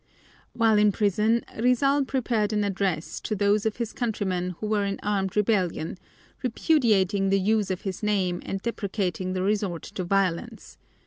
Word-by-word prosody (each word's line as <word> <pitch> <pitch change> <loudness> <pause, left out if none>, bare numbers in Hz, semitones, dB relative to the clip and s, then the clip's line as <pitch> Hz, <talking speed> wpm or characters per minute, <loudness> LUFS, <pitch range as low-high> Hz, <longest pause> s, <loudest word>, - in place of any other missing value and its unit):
While 225 -2 +3
in 210 0 +5
prison 215 +3 +1 0.2
Rizal 275 +4 +3
prepared 235 -5 0
an 210 -1 +1
address 195 -5 -2
to 215 - -3
those 205 +1 +2
of 220 - -2
his 235 -2 -4
countrymen 185 -6 -2
who - - -4
were 210 -1 +1
in 200 0 -2
armed 195 -2 -1
rebellion, 185 -5 0 0.4
repudiating 220 - +2
the 195 0 +3
use 210 +1 +1
of 185 -1 -2
his 190 -2 -5
name 190 -4 0
and 195 - -3
deprecating 190 -5 -2
the 185 0 -1
resort 200 -4 -1
to 200 -3 -5
violence. 185 -2 -2
205 Hz, 155 wpm, -26 LUFS, 190-220 Hz, 0.4 s, in